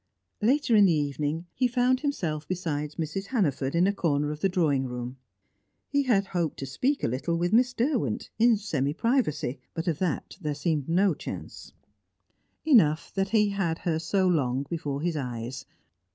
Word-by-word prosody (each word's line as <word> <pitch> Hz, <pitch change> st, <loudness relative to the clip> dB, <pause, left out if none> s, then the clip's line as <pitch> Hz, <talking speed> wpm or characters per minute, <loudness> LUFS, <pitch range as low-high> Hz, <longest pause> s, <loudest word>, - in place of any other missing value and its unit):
Later 250 Hz, +1 st, +3 dB
in 205 Hz, -1 st, +7 dB
the 180 Hz, -, +4 dB
evening, 150 Hz, +2 st, -1 dB
he 255 Hz, -, +2 dB
found 250 Hz, +1 st, +2 dB
himself 170 Hz, -, -2 dB
beside 155 Hz, -5 st, -3 dB
Mrs. 165 Hz, +6 st, -4 dB
Hannaford 145 Hz, -, 0 dB
in 175 Hz, +2 st, +4 dB
a 200 Hz, -, +2 dB
corner 150 Hz, -6 st, 0 dB
of 150 Hz, -, -6 dB
the 195 Hz, -, +2 dB
drawing 150 Hz, -7 st, +1 dB
room. 125 Hz, +1 st, -5 dB, 0.7 s
He 285 Hz, 0 st, +2 dB
had 225 Hz, -8 st, +2 dB
hoped 170 Hz, -4 st, -1 dB
to 135 Hz, -, -4 dB
speak 255 Hz, -, -1 dB
a -, -, +3 dB
little 130 Hz, +8 st, -1 dB
with 175 Hz, +3 st, 0 dB
Miss 250 Hz, +2 st, +4 dB
Derwent, 240 Hz, -, -1 dB
in 230 Hz, -1 st, +5 dB
semi 150 Hz, -8 st, -1 dB
privacy, 155 Hz, -, 0 dB, 0.2 s
but 165 Hz, +2 st, -3 dB
of 160 Hz, -4 st, 0 dB
that 180 Hz, 0 st, -2 dB
there 150 Hz, -3 st, -2 dB
seemed 150 Hz, -1 st, -1 dB
no 185 Hz, +2 st, +3 dB
chance; -, -, -8 dB, 0.9 s
enough 170 Hz, -, +4 dB
that 195 Hz, 0 st, 0 dB
he 210 Hz, -1 st, +3 dB
had 190 Hz, -5 st, -1 dB
her 165 Hz, -2 st, -1 dB
so 185 Hz, +3 st, +1 dB
long 140 Hz, -6 st, +1 dB
before 145 Hz, -4 st, -3 dB
his 175 Hz, -2 st, 0 dB
eyes. 125 Hz, -1 st, -5 dB
165 Hz, 175 wpm, -27 LUFS, 145-205 Hz, 0.9 s, in